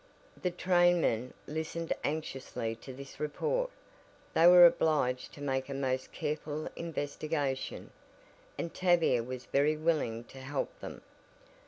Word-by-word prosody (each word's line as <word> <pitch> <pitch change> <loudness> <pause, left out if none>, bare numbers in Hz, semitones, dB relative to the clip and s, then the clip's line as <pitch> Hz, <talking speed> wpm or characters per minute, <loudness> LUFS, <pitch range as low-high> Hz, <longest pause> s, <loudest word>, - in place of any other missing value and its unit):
The 180 - +1
trainmen 175 -9 +2
listened 160 +2 -3
anxiously 135 -6 -3
to 130 - -10
this 135 +1 -10
report. - - -1 0.6
They 165 - +6
were 175 0 +10
obliged 145 -7 +2
to 145 - -11
make 135 -1 -1
a 135 - -3
most 130 -1 -1
careful 150 -1 -3
investigation, 145 -3 -3 0.7
and 170 - -4
Tavia 175 -9 +3
was 125 +1 -6
very 150 +2 +2
willing 150 -8 0
to 135 +2 -13
help 135 +1 -3
them. - - -8
150 Hz, 125 wpm, -31 LUFS, 130-165 Hz, 0.7 s, were